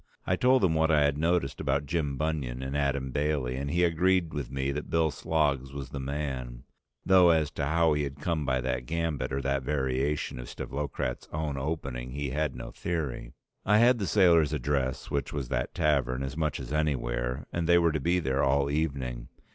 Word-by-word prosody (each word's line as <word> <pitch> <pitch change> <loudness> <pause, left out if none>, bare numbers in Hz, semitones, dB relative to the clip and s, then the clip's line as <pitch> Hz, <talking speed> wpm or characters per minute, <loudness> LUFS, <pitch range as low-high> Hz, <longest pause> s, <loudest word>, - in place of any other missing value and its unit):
I 90 - +2
told 125 +3 +3
him 90 -4 +4
what 80 0 +2
I 75 -2 +4
had 70 -1 +2
noticed 80 -5 0
about 70 +2 0
Jim 70 -2 -1
Bunion 70 -5 -2
and 65 +1 -4
Adam 70 -2 0
Bailey, 70 -3 0
and 70 +2 -3
he 85 +4 +2
agreed 90 0 +2
with 70 -5 -4
me 70 0 -2
that 75 +2 -5
Bill 80 -1 +2
Sloggs 70 -3 0
was 70 -2 -6
the 70 - -5
man, 65 -3 -4 0.4
though 95 -2 +6
as 80 -3 +3
to 70 - -2
how 80 0 +3
he 75 - 0
had 70 0 -4
come 80 0 -1
by 65 -2 0
that 60 -1 -2
gambit 80 -4 -2
or 70 +1 -2
that 70 0 0
variation 65 0 -1
of - - -7
Stavlokratz's 70 -3 -4
own 75 -2 -2
opening 70 -4 -4
he 70 -1 -3
had 75 0 -1
no - - -7
theory. 75 -8 -4 0.3
I 105 +2 +4
had 120 +2 +5
the 100 - -1
sailors' 85 -6 +4
address 70 -2 -1
which 70 -1 -1
was 70 -4 -4
that - - -2
tavern 70 -4 +1
as 65 +1 -4
much 75 -4 -1
as - - -6
anywhere, 60 -5 -1
and 85 0 -1
they 85 - +7
were 85 -1 +3
to 75 - -1
be 85 +6 +1
there 65 -3 0
all 70 +1 +2
evening. 65 -6 -2
70 Hz, 205 wpm, -28 LUFS, 65-80 Hz, 0.4 s, they